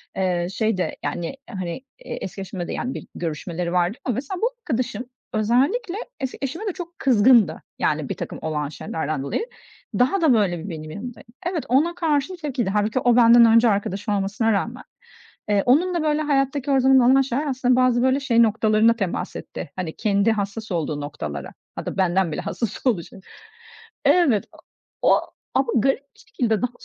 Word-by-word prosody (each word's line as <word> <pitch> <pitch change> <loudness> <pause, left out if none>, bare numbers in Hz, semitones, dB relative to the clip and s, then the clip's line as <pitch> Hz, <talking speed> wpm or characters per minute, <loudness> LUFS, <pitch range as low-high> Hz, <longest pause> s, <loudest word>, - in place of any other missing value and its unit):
eee, 180 -2 0
şey 220 -3 0
de, 180 - -2
yani, 175 +10 -3
hani, 185 +4 -5 0.2
eski 195 - -6
eşime 185 -2 -5
de, - - -4
yani, 255 +2 -3
bir - - -8
görüşmeleri 170 +2 -3
vardı 180 +5 +1
ama 250 -5 0
mesela 320 - -4
bu 470 - +3
arkadaşım 250 - -2 0.3
özellikle 280 - +1 0.2
eski 265 -2 -4
eşime 330 - -4
de 380 - -1
çok 345 -1 -9
kızgındı, 235 -3 +4 0.2
yani, - - 0
birtakım - - -5
olan 150 -2 -2
şeylerden 155 -2 -4
dolayı. 440 - -2 0.5
Daha 335 +10 +3
da 300 -6 +5
böyle 190 -4 0
benim 155 -2 -7
yanımdaydı. 230 +5 -8 0.2
Evet 350 -4 -2
ona 315 +7 +3
karşı 320 0 0
tepkiliydi. 260 - -2
Hâlbuki 210 +4 +1
o 245 -2 +3
benden 235 -1 +7
önce 230 +1 +6
arkadaşı 200 0 -1
olmasına 205 +3 0
rağmen. 235 +5 -2 0.7
Eee, 205 -1 +3
onunla 340 +6 +3
böyle 305 0 +1
hayattaki 275 -1 0
her 270 -1 +4
zaman 265 +1 +5
olan 270 +1 +6
şeyler 270 +3 -2
aslında 255 -2 +2
bazı 250 -1 +3
böyle 260 +2 +3
şey 235 -4 +3
noktalarına 220 +1 +3
temas 195 -6 -3
etti. - - -7
Hani, 180 -4 -3
kendi 205 +1 +2
hassas 205 0 -3
olduğu 155 -3 -2
noktalara. 75 - -6 0.2
Hatta - - -5
benden 185 -2 +2
bile - - -2
hassas 205 +6 -4
oluşu... 195 -4 -1 0.9
Evet 275 - +4
o - - -17 0.4
o - - +4 0.3
ama 270 - +2
garip 270 +3 +3 0.2
bir - - -24
şekilde 225 -5 -1
daha 250 0 0
230 Hz, 170 wpm, -23 LUFS, 190-270 Hz, 0.9 s, benden